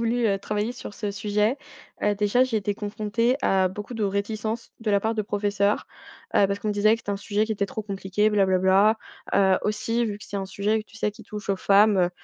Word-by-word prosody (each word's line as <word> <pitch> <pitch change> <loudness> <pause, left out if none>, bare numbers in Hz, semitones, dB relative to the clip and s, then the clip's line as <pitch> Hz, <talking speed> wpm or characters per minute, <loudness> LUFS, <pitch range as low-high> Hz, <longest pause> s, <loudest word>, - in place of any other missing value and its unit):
voulu, 235 +1 +1
heu, 195 -2 +1
travailler 210 +3 -2
sur 245 -4 -9
ce 210 -2 -3
sujet, 210 +4 0 0.5
heu, 205 0 +2
déjà, 210 +5 +3
j'ai 255 -4 -1
été 205 0 -2
confrontée 215 +4 0
à 190 -1 +3
beaucoup 205 +6 -6
de 220 -2 -1
réticences 215 +3 -2
de 225 -2 -2
la 200 - +4
part 220 +2 -1
de 215 - +1
professeurs, 205 0 0 0.5
heu, 200 - +6
parce 200 +1 -3
qu'on 215 - -2
me 210 - +1
disait 215 +2 +4
que - - -6
c'était 205 - -5
un 200 - -1
sujet 205 +1 0
qui 220 - -8
était 200 -1 -1
trop 220 - -5
compliqué 200 +1 0
«bla 205 -2 +3
bla 190 -1 +2
bla», 195 +4 +4 0.4
heu, 190 -1 +4
aussi 215 +3 0
vu 210 -3 -3
que - - -11
c'est 205 - -6
un 195 - -3
sujet 210 +3 0
que, 215 - -13
tu 205 - -16
sais, 210 - 0
qui 210 - -14
touche 210 -1 -8
aux 195 - +2
femmes, 200 +2 +4
heu, 175 -1 +3
210 Hz, 250 wpm, -25 LUFS, 200-220 Hz, 0.5 s, heu